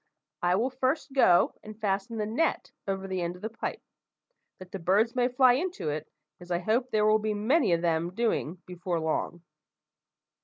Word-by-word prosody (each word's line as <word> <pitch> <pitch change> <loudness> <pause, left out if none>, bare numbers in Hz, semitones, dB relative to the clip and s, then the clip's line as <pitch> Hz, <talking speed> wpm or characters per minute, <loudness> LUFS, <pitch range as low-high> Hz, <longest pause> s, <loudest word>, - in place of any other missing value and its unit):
I 175 +1 +3
will 240 +7 0
first 265 +2 -1
go 180 -10 +5
and 215 0 -11
fasten 205 +2 -1
the 210 - -1
net 240 +10 -1 0.2
over 195 0 -2
the 185 -1 -2
end 170 +1 -2
of 180 - -15
the 220 - -3
pipe, 230 - -5 0.7
that 185 -1 -12
the 195 - -5
birds 200 +7 +2
may 250 -1 +2
fly 250 0 +5
into 340 - -2
it, 155 +1 -4 0.3
as 175 0 -13
I 175 - +1
hope 225 +8 0
there 215 -3 +2
will 215 0 +4
be 215 0 -1
many 225 - +2
of 170 0 0
them 170 +1 0
doing 185 -7 -1
before 180 -1 -3
long. 160 +2 -2
210 Hz, 190 wpm, -28 LUFS, 175-240 Hz, 0.7 s, go